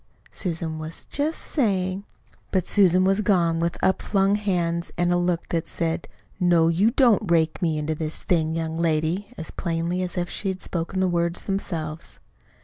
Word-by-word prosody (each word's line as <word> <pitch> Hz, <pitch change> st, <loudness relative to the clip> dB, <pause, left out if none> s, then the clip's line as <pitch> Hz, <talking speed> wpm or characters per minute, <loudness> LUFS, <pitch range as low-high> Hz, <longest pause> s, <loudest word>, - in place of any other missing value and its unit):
Susan 165 Hz, -3 st, -4 dB
was 155 Hz, +1 st, -8 dB
just 300 Hz, +3 st, -1 dB
saying 195 Hz, -, -1 dB, 0.2 s
." -, -, -32 dB
But 185 Hz, -3 st, +1 dB
Susan 185 Hz, -3 st, +4 dB
was 195 Hz, +2 st, +3 dB
gone 170 Hz, -5 st, +2 dB
with 170 Hz, +1 st, -1 dB
upflung 195 Hz, +1 st, +2 dB
hands 175 Hz, -5 st, 0 dB
and 175 Hz, 0 st, +2 dB
a -, -, +3 dB
look 175 Hz, -1 st, 0 dB
that 165 Hz, -1 st, -1 dB
said 165 Hz, 0 st, -2 dB, 0.3 s
"No, 170 Hz, -3 st, +4 dB
you 185 Hz, +7 st, +3 dB
don't 235 Hz, -6 st, +3 dB
rake 160 Hz, -2 st, +2 dB
me 160 Hz, -3 st, +1 dB
into 150 Hz, +1 st, -1 dB
this 155 Hz, 0 st, -4 dB
thing, 160 Hz, -2 st, +1 dB
young 160 Hz, -1 st, -2 dB
lady!" 165 Hz, +4 st, 0 dB
as 160 Hz, -, -6 dB
plainly 170 Hz, +1 st, -2 dB
as 180 Hz, 0 st, -4 dB
if 175 Hz, 0 st, 0 dB
she 200 Hz, -, -4 dB
had 190 Hz, -1 st, -2 dB
spoken 175 Hz, +2 st, -2 dB
the 190 Hz, -, +3 dB
words 170 Hz, -1 st, 0 dB
themselves. 165 Hz, -5 st, -4 dB
175 Hz, 175 wpm, -24 LUFS, 165-190 Hz, 0.3 s, Susan